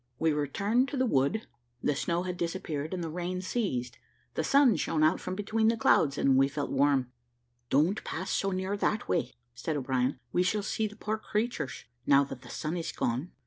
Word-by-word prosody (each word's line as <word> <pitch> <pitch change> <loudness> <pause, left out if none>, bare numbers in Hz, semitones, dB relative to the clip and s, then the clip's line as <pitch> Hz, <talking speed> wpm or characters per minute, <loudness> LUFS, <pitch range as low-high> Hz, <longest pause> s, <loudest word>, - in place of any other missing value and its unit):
We 160 +2 +2
returned 200 - +1
to 275 - -4
the 260 - +3
wood; 175 - +1 0.4
the 145 - +2
snow 170 +5 0
had 180 -1 -3
disappeared, 165 -4 -3
and 180 -2 -3
the 165 - -3
rain 180 +2 -3
ceased; 185 - -2 0.3
the - - -1
sun 275 - +5
shone 155 -1 0
out 155 +4 +4
from 185 - -4
between 215 +2 +1
the 230 +1 +3
clouds, 145 -9 +3
and 135 -1 +4
we 135 0 +5
felt 140 +1 -3
warm. 135 -2 +2 0.6
"Don't 160 +10 +2
pass 185 +4 -4
so 195 - +1
near 190 +1 -1
that 215 +1 0
way," - - 0 0.2
said 145 +5 -3
O'Brien, 130 -1 0 0.2
"we 180 - +3
shall 200 +3 +1
see 215 +1 -1
the 210 - -11
poor 215 +1 -3
creatures, 210 - -2 0.2
now 140 0 +6
that 135 -2 -7
the 125 - -13
sun 155 +7 -3
is 165 - -3
gone. 125 +9 -1
170 Hz, 200 wpm, -30 LUFS, 140-205 Hz, 0.6 s, now